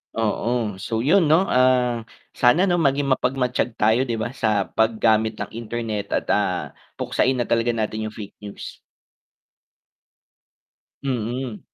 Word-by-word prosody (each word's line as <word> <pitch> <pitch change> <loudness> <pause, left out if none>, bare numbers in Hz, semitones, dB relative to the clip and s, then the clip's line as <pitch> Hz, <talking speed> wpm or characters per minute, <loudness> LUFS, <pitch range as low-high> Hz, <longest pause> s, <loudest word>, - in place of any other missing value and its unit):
Oo. 115 -2 -1
So, 115 +3 -2
yun 170 +2 +4
'no, 160 +5 +5
ah, 125 -5 +2 0.2
sana 125 +9 +3
'no 175 -3 +2
maging 140 -2 +1
mapagmatyag 125 -3 0
tayo 115 +5 +2
'di 115 - -1
ba, 115 +2 -3
sa 110 -6 +1
pag-gamit 110 0 +2
ng 100 -1 -6
internet 115 -2 -4
at, - - -1
ah, - - 0 0.2
puksain 130 +1 0
na 120 - 0
talaga 115 0 +1
natin 110 0 -2
yung 110 - -9
fake 105 -2 -9
news. 105 -1 -9 2.2
Mm. 125 -2 -3
115 Hz, 135 wpm, -22 LUFS, 110-130 Hz, 2.2 s, no